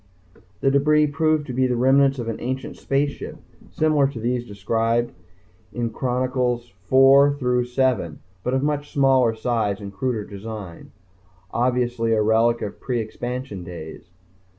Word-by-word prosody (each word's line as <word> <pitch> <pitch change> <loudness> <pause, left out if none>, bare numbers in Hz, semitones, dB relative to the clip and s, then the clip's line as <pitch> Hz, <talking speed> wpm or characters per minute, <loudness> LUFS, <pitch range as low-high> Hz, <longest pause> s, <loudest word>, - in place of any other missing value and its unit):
The 135 - +3
debris 150 +2 +4
proved 155 +1 +1
to 130 - -6
be 130 +1 +2
the 125 - 0
remnants 135 +2 +4
of 120 -2 -4
an 115 - -3
ancient 130 +2 -4
spaceship 140 +1 -2 0.3
similar 155 -3 +2
to 135 -4 -7
those 120 +1 -2
described 115 +4 0 0.6
in 120 -1 -2
Sector 110 - -16
Chronicles 125 -2 -1 0.2
IV 135 +2 +6
through 125 -2 +1
VII, 125 - 0 0.3
but 125 - 0
of 130 - 0
much 145 0 -2
smaller 130 -4 +3
size 110 -3 -1
and 100 -1 -8
cruder 115 -1 -2
design 100 -3 -8 0.6
obviously 120 -1 0
a 110 - +2
relic 115 +2 +2
of 100 - -6
pre 125 -2 -2
expansion 120 -2 -5
days. 85 0 -9
125 Hz, 150 wpm, -23 LUFS, 115-135 Hz, 0.6 s, IV